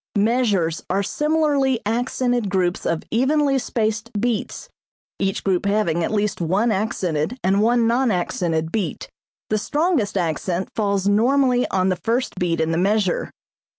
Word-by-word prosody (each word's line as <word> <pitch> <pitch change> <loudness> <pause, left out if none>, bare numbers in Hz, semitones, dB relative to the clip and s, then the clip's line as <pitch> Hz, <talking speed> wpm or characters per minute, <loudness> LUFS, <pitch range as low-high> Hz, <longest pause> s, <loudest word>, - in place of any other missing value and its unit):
Measures 205 -7 +1
are 195 +2 +1
similarly 295 -2 +1
accented 245 0 0
groups 185 -2 0
of 165 -1 -1
evenly 275 +3 +2
spaced 225 -1 -2
beats, 230 -1 -2 0.5
each 195 0 -1
group 190 0 0
having 195 -5 +1
at - - -1
least 210 -3 -1
one 195 +8 +1
accented 190 - -1
and 195 +2 +2
one 235 +1 +3
non 240 +2 +2
accented 170 -4 -1
beat. 190 -8 -3 0.4
The 215 - +2
strongest 295 - 0
accent 175 +1 -2
falls 200 -2 0
normally 250 +4 +3
on 190 0 +1
the 185 - 0
first 235 +3 0
beat 170 -2 0
in 160 0 0
the 165 - 0
measure. 200 -1 +1
210 Hz, 145 wpm, -21 LUFS, 185-245 Hz, 0.5 s, one